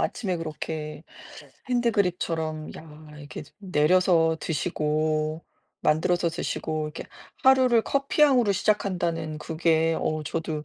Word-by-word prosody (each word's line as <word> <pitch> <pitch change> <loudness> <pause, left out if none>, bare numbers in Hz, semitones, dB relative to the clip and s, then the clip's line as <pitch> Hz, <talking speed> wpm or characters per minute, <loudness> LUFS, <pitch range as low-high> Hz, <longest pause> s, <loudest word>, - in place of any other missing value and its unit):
아침에 190 -7 -1
그렇게 155 -1 -5 0.6
핸드 240 -2 +2
드립처럼 165 -5 -1
야 155 -1 -13
이렇게 145 0 -8 0.2
내려서 170 -2 +3
드시고 155 0 -1 0.4
만들어서 170 +3 +2
드시고 155 -2 -3
이렇게 150 - -6 0.4
하루를 255 -3 +5
커피향으로 275 -5 +3
시작한다는 175 -6 -1
그게 160 +1 +1
어 155 0 -1
저도 155 -1 -3
165 Hz, 280 characters per minute, -26 LUFS, 155-185 Hz, 0.6 s, 하루를